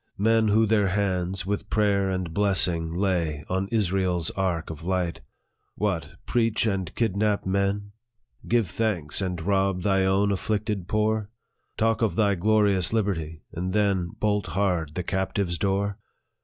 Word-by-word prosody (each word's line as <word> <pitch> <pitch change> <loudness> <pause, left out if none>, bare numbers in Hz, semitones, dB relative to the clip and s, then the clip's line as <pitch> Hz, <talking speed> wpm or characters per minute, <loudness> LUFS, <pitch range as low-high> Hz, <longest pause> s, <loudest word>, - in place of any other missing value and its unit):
Men 110 +2 +3
who 110 +2 +4
their 105 -2 +2
hands, 95 -2 -1
with 100 +1 -3
prayer 100 -2 +2
and 95 -3 -3
blessing, 90 -4 +2
lay 85 -5 -1
On 95 +1 0
Israel's 95 -5 0
ark 90 -4 -2
of 80 0 -9
light 90 -1 -1 0.3
" - - -48
What! 85 -8 -2
preach, 115 -2 +1
and 95 -5 -1
kidnap 105 -2 0
men? 100 +1 0 0.6
Give 115 -4 +2
thanks, 90 -5 -1
and 90 -2 -2
rob 95 +1 0
thy 95 -1 +2
own 95 +2 +2
afflicted 105 -1 -2
poor? 110 0 0 0.5
Talk 115 +1 +1
of 110 - +1
thy 105 -3 +3
glorious 100 -1 +2
liberty, 85 -8 -2
and 90 +2 -3
then 100 -4 +1
Bolt 105 -3 0
hard 85 -3 -1
the 90 - -2
captive's 95 -2 -1
door 100 +3 0
95 Hz, 145 wpm, -26 LUFS, 90-105 Hz, 0.6 s, who